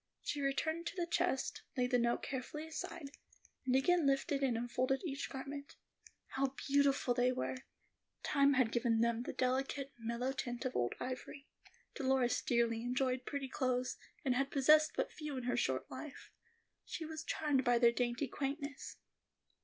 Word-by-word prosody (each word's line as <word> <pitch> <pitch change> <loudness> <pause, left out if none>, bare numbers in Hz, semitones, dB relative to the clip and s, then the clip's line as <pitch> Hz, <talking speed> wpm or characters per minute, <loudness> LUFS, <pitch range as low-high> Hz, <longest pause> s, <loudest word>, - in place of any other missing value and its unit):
She 290 - -2
returned 315 +5 0
to 395 - -4
the 350 -2 0
chest, 345 -5 0 0.2
laid 250 0 +1
the 245 - +4
note 235 0 +1
carefully 280 +4 -4
aside, 320 -2 -6 0.6
and 255 - +3
again 325 +3 +4
lifted 275 +1 +1
out - - +5
and 235 -3 0
unfolded 255 +4 0
each 280 -3 -3
garment. 280 +1 -6 0.5
How 270 0 -1
beautiful 280 -2 +3
they 250 +1 +3
were! 255 0 -2 0.7
Time 280 -1 +4
had 255 -4 +3
given 235 -2 +2
them 235 0 +2
the - - -4
delicate, 270 +2 -1
mellow 235 +3 -1
tint 245 -2 -4
of 255 - -2
old 120 0 0
ivory. 260 +3 -6 0.5
Dolores 260 -2 +2
dearly 235 -2 +1
enjoyed 255 +1 0
pretty 280 -2 -2
clothes, 255 -1 -1 0.3
and 260 - +3
had 270 +2 +1
possessed 305 +3 +5
but - - -1
few 300 -3 -5
in 255 - -3
her 245 0 0
short 130 - 0
life. 300 -3 -8 0.5
She 325 - -5
was 315 0 -5
charmed 290 -5 +1
by 245 0 +4
their 235 0 +6
dainty 240 +3 0
quaintness. 280 +2 -4
265 Hz, 165 wpm, -36 LUFS, 245-285 Hz, 0.7 s, their